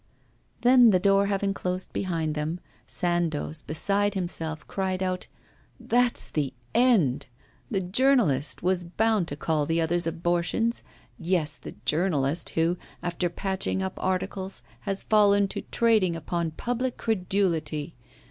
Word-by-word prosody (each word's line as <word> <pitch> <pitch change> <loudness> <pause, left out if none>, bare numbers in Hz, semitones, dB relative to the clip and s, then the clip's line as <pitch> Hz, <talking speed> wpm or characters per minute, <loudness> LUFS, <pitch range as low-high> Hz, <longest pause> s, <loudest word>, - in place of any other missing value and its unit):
Then, 245 -1 +7
the 185 -3 +4
door 200 +1 +3
having 200 0 0
closed 185 -1 -4
behind 165 -5 -1
them, 155 +3 -3 0.3
Sandoz, 165 -3 -1
beside 200 +6 +1
himself, 165 -4 -4
cried 190 -1 -2
out: 185 -1 -2 0.5
'That's 245 0 +2
the 140 -4 -2 0.2
end! 195 - +3 0.4
The 195 - 0
journalist 185 - +2
was 180 0 +1
bound 205 +1 +1
to 145 - -4
call 150 -1 0
the 165 +1 +1
others 165 +1 +1
abortions 175 +7 0 0.4
yes, 165 -4 0
the 125 - -10
journalist 155 -2 +1
who, 165 +2 +2 0.3
after 175 0 -1
patching 190 +1 -2
up 190 0 -3
articles, 190 +1 -2 0.3
has 195 0 -1
fallen 205 -2 +4
to - - -4
trading 220 -7 +3
upon 170 0 -2
public 245 +9 -3
credulity! 180 -7 -1
180 Hz, 130 wpm, -26 LUFS, 165-200 Hz, 0.5 s, Then